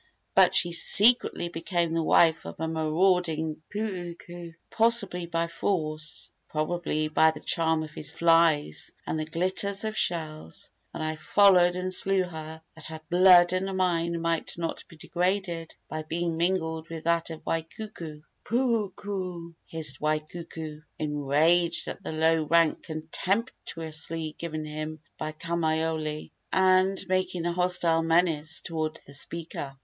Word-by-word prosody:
But - - +5
she 175 - +5
secretly 210 +1 +6
became 170 -1 -2
the 165 - +1
wife 160 0 +3
of - - -9
a 160 - -2
marauding 160 -1 0
puuku 175 -4 -6 0.2
possibly 215 -6 +3
by 165 0 -1
force, 155 -3 -3 0.2
probably 155 0 -2
by 160 +1 +4
the 160 - -5
charm 160 -1 +1
of 155 - -9 0.3
lies 165 - +3
and 160 - -2
the 155 - -2
glitter 180 +5 0 0.2
of 215 0 -3
shells 155 - -2 0.2
and - - -5
I 155 0 -3
followed 180 +1 +4
and 185 0 -3
slew 195 0 +3
her, 160 -2 -8
that 160 - -5
her 160 0 -7
blood 180 0 +6
and 190 +1 -1
mine 170 -2 0
might 165 0 -2
not 165 -1 -4
be - - -15
degraded 175 -1 -2
by 155 - -5
being 165 +2 -3
mingled 160 -2 -1
with 165 -1 -7
that 170 0 +1
of 160 -1 -8
Waikuku!" 165 -1 -5 0.2
"Puuku!" 200 -7 -2
hissed 155 -4 -2
Waikuku, 155 0 -4 0.2
enraged 155 +4 +1
at - - -6
the 195 - -6
low 160 +1 +2
rank 165 +1 +3
contemptuously 160 -2 -3
given 155 -2 -5
him 155 +1 -6 0.2
by 155 0 -3
Kamaiole, 160 -1 -2 0.2
and 190 +1 +3
making 185 -2 -1
a 175 - 0
hostile 175 -2 +1
menace 165 -2 +1
toward 160 -1 -4
the 140 - -13
speaker. 145 -2 -5
165 Hz, 135 wpm, -27 LUFS, 155-180 Hz, 0.3 s, secretly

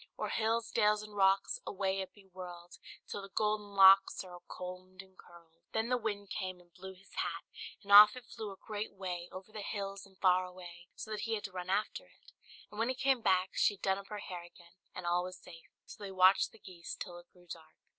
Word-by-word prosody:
O'er - - -2
hills, 230 +1 0
dales, 210 0 +3
and 210 -1 -11
rocks, 195 0 +3
Away 195 -1 -1
be 205 - -20
it 190 -2 -26
whirl'd, 175 -1 -9 0.3
Till 205 - -5
the 195 - -10
golden 210 0 -1
locks 195 0 +7
Are 185 -1 -12
all 175 0 -11
comb'd 185 +1 -8
and 190 0 -23
curl'd!" 170 -3 -17 0.2
Then 220 +1 0
the 250 - +3
wind 205 -3 -4
came 185 -2 -4
and 175 -1 -22
blew 190 +2 -10
his 190 +2 -21
hat, - - -2 0.4
and 200 - -7
off 210 +2 +11
it 250 -2 -10
flew 220 -4 -7
a - - -9
great 210 +2 -5
way, 180 -2 -5
over 190 +3 -10
the 215 -1 -6
hills 200 -1 -5
and 190 -1 -23
far 185 -1 +4
away, 180 -1 -11
so 220 - -8
that 215 - -3
he 225 +1 -1
had 210 - -5
to 200 - -6
run 180 0 -6
after 210 - -1
it; - - -22 0.4
and 210 - -9
when 230 +2 +1
he 260 - 0
came 265 -1 +2
back, 185 -2 +2
she 205 - +3
had - - -26
done 190 0 +1
up 195 - -11
her 210 - -6
hair 180 -3 -6
again, 175 0 -17 0.2
and 180 - -6
all 175 +1 +2
was 185 0 -7
safe. 165 -2 -14 0.2
So - - -12
they 200 - -5
watched 185 +1 +5
the - - -17
geese 180 -4 -9
till 175 -1 -7
it 175 - -19
grew 180 -1 -21
dark. 165 -2 -11
190 Hz, 240 wpm, -33 LUFS, 180-210 Hz, 0.4 s, off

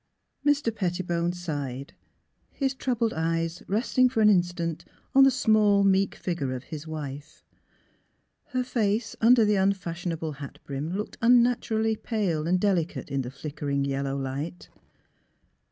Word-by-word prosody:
Mr. 285 -6 +2
Pettibone 175 -3 -1
sighed, 145 -7 -5 0.6
his 270 -2 -1
troubled 240 -4 -1
eyes 165 +1 -1
resting 250 +5 +2
for 235 - -2
an 210 - +6
instant 175 -3 0 0.3
on 270 - +7
the 270 - +7
small, 215 -5 +3
meek 195 0 +2
figure 155 -8 -3
of 125 - -7
his 155 +1 -8
wife. 150 -1 -7 1.0
Her 255 -3 -2
face 225 -2 -1
under 230 0 +6
the 210 -1 +2
unfashionable 175 -4 -1
hat 140 - -8
brim 140 +3 -4
looked 210 - -6
unnaturally 230 -2 +3
pale 190 -9 -1
and 180 +1 +2
delicate 180 -7 -1
in 135 -1 0
the 125 - -5
flickering 140 0 -3
yel 140 0 -2
low 135 0 -2
light. 140 +6 -5
180 Hz, 135 wpm, -27 LUFS, 155-220 Hz, 1.0 s, on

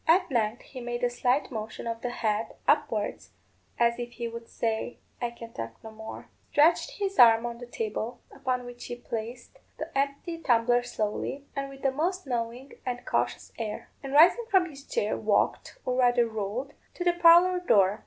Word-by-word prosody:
At 360 0 +4
length 230 -1 0
he 255 - -9
made 240 0 -4
a 245 - +2
slight 250 +4 +1
motion 220 -1 -5
of 230 0 -3
the 245 - -2
head 220 -2 -1
upwards, 220 - +1 0.5
as 235 0 +2
if 240 0 -5
he 235 -1 -4
would 230 0 -8
say, 225 +1 -2 0.2
"I 240 - 0
can 230 -1 -11
talk 115 0 -6
no 220 - -8
more;" 220 0 -9 0.2
stretched 315 +4 +3
his 395 -1 -2
arm 230 -1 +8
on 235 0 -5
the 245 - -8
table, 225 0 -3
upon 255 -2 -2
which 245 0 -9
he 240 - -5
placed 235 0 -6 0.2
the - - -6
empty 280 +5 -1
tumbler 240 -4 +3
slowly, 245 +4 -3
and 275 0 -3
with 275 0 -12
the 270 - +3
most 350 +6 -1
knowing 245 +1 -3
and 245 -1 -4
cautious - - -1
air; 215 -2 -5
and 275 -1 -6
rising 355 +10 +6
from 380 -5 +5
his 280 -4 -11
chair, 475 - -1
walked, - - 0
or 255 - 0
rather 245 -2 +4
rolled, 220 +5 -4 0.2
to 355 - -3
the 350 -1 +3
parlour 350 +1 +6
door. 205 - +3
245 Hz, 185 wpm, -28 LUFS, 230-280 Hz, 0.5 s, arm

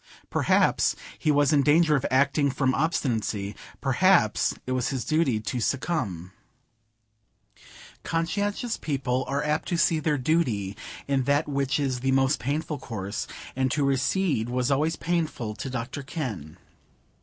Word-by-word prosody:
Perhaps - - +3 0.2
he - - 0
was 145 0 +4
in 145 - +5
danger 150 +2 +4
of 135 - 0
acting 140 +2 +3
from 130 -1 +1
obstinacy; 110 -10 -1 0.3
perhaps - - +3
it 130 - -4
was 130 -2 0
his 130 -3 -3
duty 155 -8 +2
to 110 +4 -3
succumb. 110 - -2 1.7
Conscientious 205 +7 -1
people 135 -3 -1
are 140 +1 -1
apt 150 +1 -1
to 175 - 0
see 165 -1 +3
their 150 -1 0
duty 125 - 0 0.3
in 135 -2 +1
that 140 +3 +2
which 140 0 0
is 135 -3 -1
the 135 +1 +1
most 135 0 +2
painful 150 +3 -2
course; 100 -5 -5 0.3
and 130 0 +1
to 145 +2 0
recede 140 - +1
was 125 +2 0
always 150 +4 +1
painful 160 -10 -2
to 130 - -6
Dr 125 +2 -4
Kenn. 125 - -5
140 Hz, 145 wpm, -26 LUFS, 125-155 Hz, 1.7 s, in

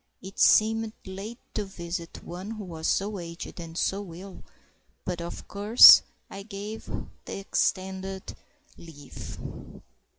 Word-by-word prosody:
It 190 +1 -10
seemed 220 0 +4
late 195 +5 -7 0.2
to 210 - -1
visit 170 -3 -7
one 180 +4 -7
who 220 -2 -6
was 160 -3 -5
so 200 0 0
aged 170 +1 -8
and 165 -1 -8
so 195 -3 -2
ill, 190 +2 -10 0.6
but, 175 -2 -3
of 170 - -7
course, 210 +4 +9 0.3
I 195 - -8
gave 210 +1 -8 0.4
the - - -5
extended 190 -1 -2 0.4
leave. 145 -4 -10
190 Hz, 125 wpm, -27 LUFS, 170-205 Hz, 0.6 s, course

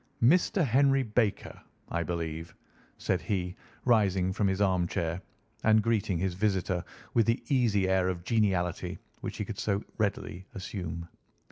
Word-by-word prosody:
"Mr. 170 - +4
Henry 135 +2 +4
Baker, 110 -2 -1 0.3
I 85 - -1
believe," 80 0 -4 0.4
said 90 -3 0
he, 90 +1 -2 0.3
rising 95 -6 +3
from 105 0 +1
his 95 0 0
armchair 90 -3 +1 0.4
and 110 -1 +5
greeting 105 -5 +1
his 90 +1 0
visitor 95 -2 0 0.3
with 115 -2 +3
the 115 - +1
easy 115 -8 +3
air 95 -1 +2
of 90 -2 -3
geniality 95 -5 0 0.2
which - - -5
he - - -2
could - - -6
so 100 -1 0 0.2
readily 95 -3 -2
assume. 90 -4 -5
95 Hz, 140 wpm, -29 LUFS, 90-110 Hz, 0.4 s, and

